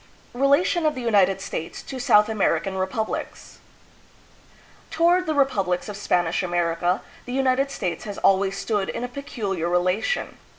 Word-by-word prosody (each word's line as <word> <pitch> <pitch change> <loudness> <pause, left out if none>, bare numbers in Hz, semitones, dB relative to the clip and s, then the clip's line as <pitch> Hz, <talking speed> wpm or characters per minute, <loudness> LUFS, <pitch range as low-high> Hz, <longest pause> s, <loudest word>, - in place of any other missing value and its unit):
Relation 280 +7 +2
of 305 - 0
the 255 - -5
United 200 -5 +3
States 165 -3 -5
to 265 - -7
South 220 -5 +5
American 200 -2 0
Repub 190 +4 -1
lics. - - -7 1.3
Toward 345 +2 +2
the 310 - 0
republics 200 -11 +1
of 210 - -6
Spanish 175 -4 0
America 175 0 0 0.2
the 245 - -6
United 265 +1 +2
States 180 -11 -4
has 205 -2 -6
always 195 0 +2
stood 205 -3 -1
in 235 - -4
a - - -2
peculiar 210 - -4
relation. 180 - 0
210 Hz, 145 wpm, -24 LUFS, 185-270 Hz, 1.3 s, South